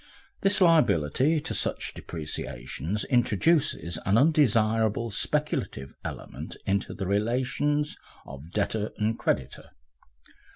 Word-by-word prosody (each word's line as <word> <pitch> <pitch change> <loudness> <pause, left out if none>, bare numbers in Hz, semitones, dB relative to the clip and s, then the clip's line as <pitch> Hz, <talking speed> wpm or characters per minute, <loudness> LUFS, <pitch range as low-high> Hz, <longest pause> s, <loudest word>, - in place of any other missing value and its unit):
The 195 +1 +3
liability 155 - +4
to - - -4
such - - -1
depreciations 80 - -4
introduces 120 - +1
an 100 +2 +3
undesirable 115 -6 +3
speculative 65 -8 -1
element - - -7
into 100 0 -1
the 95 - -4
relations 130 +9 0 0.3
of 70 +3 -10
debtor 105 +2 -1
and 110 +1 0
creditor. 65 - -2
110 Hz, 95 wpm, -27 LUFS, 90-140 Hz, 0.3 s, liability